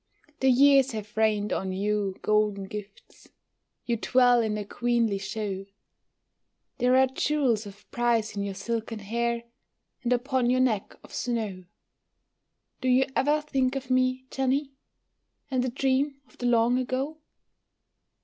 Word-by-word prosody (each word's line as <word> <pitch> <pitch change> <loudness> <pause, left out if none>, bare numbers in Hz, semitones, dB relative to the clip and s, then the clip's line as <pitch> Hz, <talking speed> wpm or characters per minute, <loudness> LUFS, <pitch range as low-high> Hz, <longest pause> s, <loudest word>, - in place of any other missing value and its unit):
The 265 - +3
years 275 0 +5
have 210 -1 -7
rained 215 -1 +1
on 190 0 -2
you 200 0 -1
golden 210 -2 +1
gifts, 205 +1 -10 0.6
You 235 -1 0
dwell 245 +1 +4
in 215 -2 -1
a 210 - -4
queenly 235 -2 0
show; 195 -1 -4 1.1
There 250 +1 +4
are 265 - +6
jewels 265 -5 0
of 200 +1 -13
price 230 -3 +1
in 200 - -2
your 200 -1 -3
silken 225 +3 -3
hair, 235 +3 -2 0.6
And 245 - -2
upon 250 0 +1
your 255 +1 +3
neck 230 -6 0
of - - -15
snow. 215 -7 -3 1.2
Do 260 - -1
you 255 +1 +4
ever 295 +3 +2
think 270 -3 0
of 265 -1 -4
me, 255 0 +1
Jenny, 270 +1 0 0.8
And 255 -1 +1
the 255 - 0
dream 270 +2 0
of - - -23
the 245 - -1
long 240 +1 +3
ago? 265 +5 -3
240 Hz, 140 wpm, -27 LUFS, 210-260 Hz, 1.2 s, are